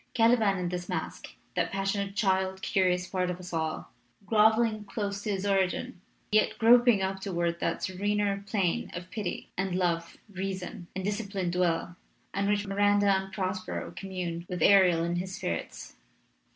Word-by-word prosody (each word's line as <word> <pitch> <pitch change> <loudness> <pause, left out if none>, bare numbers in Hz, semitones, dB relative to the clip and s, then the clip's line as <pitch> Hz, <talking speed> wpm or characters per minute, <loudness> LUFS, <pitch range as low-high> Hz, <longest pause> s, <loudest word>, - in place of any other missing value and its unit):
Cali 230 0 +6
ban 210 -4 +2
is - - -3
in 175 - -1
this 180 0 -5
masque - - -5 0.2
that - - 0
passionate 195 0 -1
child 190 -2 +1
curious 180 -1 +2
part 185 -1 -1
of 180 0 -4
us 180 -1 -9
all, 160 -1 -2 0.3
groveling 220 0 +3
close 200 -1 -3
to 210 - -4
his 195 -1 -1
origin, 190 -2 0 0.3
yet 215 0 +3
groping 235 -3 +6
up 190 0 -2
toward 170 -3 -1
that 170 - -1
serener 200 +1 0
plane 195 -4 0
of 180 +1 -7
pity 210 -5 -4
and 190 -1 -1
love, 170 -2 -1
reason, 190 -3 -5
and 190 0 -3
disciplined 200 -4 -2
will, 175 -1 0 0.4
on 200 0 0
which 205 0 +1
Miranda 205 0 +3
and 190 0 -3
Prospero 185 -1 -3
commune 180 -3 -5
with 180 -3 -2
Ariel 180 -4 +6
and 170 +1 -1
his 185 +1 -5
spirits. 85 -1 -5
190 Hz, 165 wpm, -29 LUFS, 180-205 Hz, 0.4 s, Cali